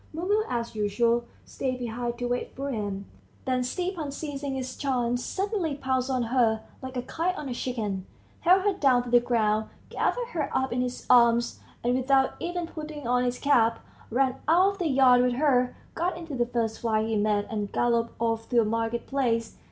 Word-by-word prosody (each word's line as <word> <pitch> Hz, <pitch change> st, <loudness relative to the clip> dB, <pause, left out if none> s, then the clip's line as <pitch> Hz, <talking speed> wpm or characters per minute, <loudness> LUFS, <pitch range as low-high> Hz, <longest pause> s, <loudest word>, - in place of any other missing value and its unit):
Mumu, 395 Hz, +6 st, +1 dB
as 235 Hz, -1 st, -2 dB
usual, 230 Hz, +3 st, +1 dB, 0.2 s
stayed 255 Hz, -1 st, -3 dB
behind 240 Hz, 0 st, -3 dB
to 245 Hz, -, -3 dB
wait 245 Hz, 0 st, -2 dB
for 275 Hz, +1 st, -3 dB
him. 200 Hz, -4 st, -3 dB, 0.4 s
Then 255 Hz, -1 st, +1 dB
Stepan, 340 Hz, +2 st, -3 dB
seizing 280 Hz, -1 st, -4 dB
his 260 Hz, -1 st, -4 dB
chance, 245 Hz, -3 st, 0 dB
suddenly 390 Hz, -6 st, -1 dB
pounced 260 Hz, -2 st, -1 dB
on 255 Hz, -2 st, +1 dB
her, 230 Hz, -2 st, +2 dB, 0.2 s
like 260 Hz, -1 st, -6 dB
a 245 Hz, -, -2 dB
kite 335 Hz, +7 st, -1 dB
on 300 Hz, -, -5 dB
a 255 Hz, -, -3 dB
chicken, 210 Hz, -7 st, -3 dB, 0.3 s
held 370 Hz, +2 st, +4 dB
her 410 Hz, 0 st, +2 dB
down 265 Hz, -9 st, +3 dB
to 245 Hz, -, -7 dB
the 245 Hz, -, +7 dB
ground, 220 Hz, -3 st, +1 dB, 0.2 s
gathered 485 Hz, -1 st, -1 dB
her 315 Hz, -10 st, -2 dB
up 265 Hz, -2 st, 0 dB
in 250 Hz, -, 0 dB
his 250 Hz, 0 st, -4 dB
arms, 235 Hz, -1 st, +4 dB, 0.2 s
and 240 Hz, +1 st, +2 dB
without 265 Hz, +1 st, +3 dB
even 350 Hz, 0 st, -3 dB
putting 305 Hz, -4 st, -7 dB
on 250 Hz, +1 st, +2 dB
his 245 Hz, 0 st, -1 dB
cap, 230 Hz, -5 st, +3 dB, 0.3 s
ran 260 Hz, +2 st, +1 dB
out 360 Hz, +5 st, +5 dB
of 400 Hz, -, -11 dB
the 350 Hz, -, 0 dB
yard 260 Hz, -3 st, +5 dB
with 250 Hz, 0 st, +2 dB
her, 255 Hz, -2 st, +2 dB, 0.2 s
got 345 Hz, +1 st, -1 dB
into 330 Hz, -3 st, -7 dB
the 240 Hz, -2 st, 0 dB
first 230 Hz, -2 st, -1 dB
fly 220 Hz, -2 st, +1 dB
he 225 Hz, 0 st, -1 dB
met, 205 Hz, -1 st, +1 dB
and 210 Hz, -2 st, -3 dB
galloped 235 Hz, -1 st, +1 dB
off 225 Hz, -1 st, -1 dB
to 245 Hz, -, +4 dB
a 225 Hz, -, +3 dB
market 230 Hz, +2 st, -1 dB
place. 235 Hz, -5 st, -1 dB
250 Hz, 195 wpm, -27 LUFS, 235-280 Hz, 0.4 s, the